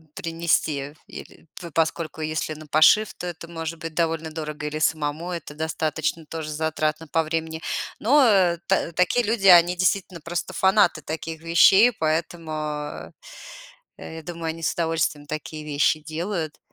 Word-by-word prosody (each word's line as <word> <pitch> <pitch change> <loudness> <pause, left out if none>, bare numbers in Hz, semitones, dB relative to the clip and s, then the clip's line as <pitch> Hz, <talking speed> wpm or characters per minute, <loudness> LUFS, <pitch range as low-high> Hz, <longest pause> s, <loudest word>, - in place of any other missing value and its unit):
принести, 160 -4 -1
или - - -12
По 170 -1 -8
поскольку 160 0 -1
если 155 0 -2
на 155 +1 -11
пошив, 170 +9 +5
то 180 - -6
это 170 -1 -7
может 165 -1 -6
быть 165 0 -6
довольно 165 -1 -1
дорого, 150 -1 -5
или 155 +1 -4
самому 155 +2 -1
это 170 -4 -6
достаточно 160 0 -2
тоже 160 0 -6
затратно 155 0 -2
по 165 - +1
времени. 160 0 -3 0.4
Но 210 -9 +4
та - - +1
такие 180 +8 +2
люди, 210 -2 +1
они 175 -1 +7
действительно 185 -1 0
просто 170 +2 -4
фанаты 190 -4 +3
таких 160 +1 -5
вещей, 190 +7 +6
поэтому, 155 -4 -3 0.9
я 160 0 -8
думаю, 170 0 -6
они 165 +1 -8
с - - +1
удовольствием 160 -3 -1
такие 155 +1 -6
вещи 150 +1 +1
делают. 160 +1 -4
160 Hz, 145 wpm, -24 LUFS, 155-170 Hz, 0.9 s, они